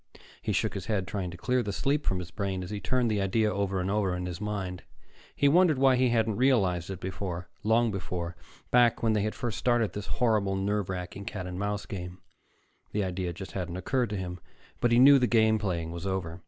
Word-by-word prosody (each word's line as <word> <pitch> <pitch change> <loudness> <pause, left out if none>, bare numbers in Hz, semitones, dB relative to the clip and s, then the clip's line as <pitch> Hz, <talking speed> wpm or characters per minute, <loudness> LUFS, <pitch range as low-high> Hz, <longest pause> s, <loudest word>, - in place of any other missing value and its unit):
He - - -2
shook - - 0
his - - -6
head, 100 -4 -1
trying 95 -3 -3
to 85 - -9
clear 125 +7 +1
the 105 -3 -3
sleep 140 +8 0
from 95 - +1
his 90 -1 -6
brain 95 -3 -3
as 90 - -7
he 105 - -3
turned 125 0 +1
the 105 -2 +1
idea 105 +3 +1
over 100 -1 -1
and 90 +1 -1
over 100 -3 +1
in 90 0 -3
his 90 +1 -5
mind. 95 -4 -3 0.5
He 140 - +3
wondered 165 0 +5
why 135 -1 +5
he 125 0 +3
hadn't 110 -3 +1
realized 100 -10 +2
it 95 -2 -5
before, 90 -2 -5
long 115 +2 +3
before, 90 -2 -4 0.4
back 120 -2 +4
when 110 -1 +3
they 105 - +2
had 110 +1 -2
first 120 -3 -3
started 120 -4 +2
this 105 -1 -5
horrible, 105 -5 +1
nerve 100 0 -1
wracking 90 +2 -5
cat 95 -3 -5
and 90 0 -5
mouse 105 0 -2
game. 90 -2 -6 0.8
The 105 - +1
idea 90 -1 -2
just 95 +3 -8
hadn't 90 -2 -4
occurred 125 +5 0
to 105 - -3
him. 90 -1 -5 0.4
But 120 - +2
he 120 - +5
knew 135 +2 +8
the 125 - +2
game 110 -2 +4
playing 85 -5 -2
was 85 +3 -5
over. 90 -3 -3
100 Hz, 225 wpm, -28 LUFS, 90-115 Hz, 0.8 s, knew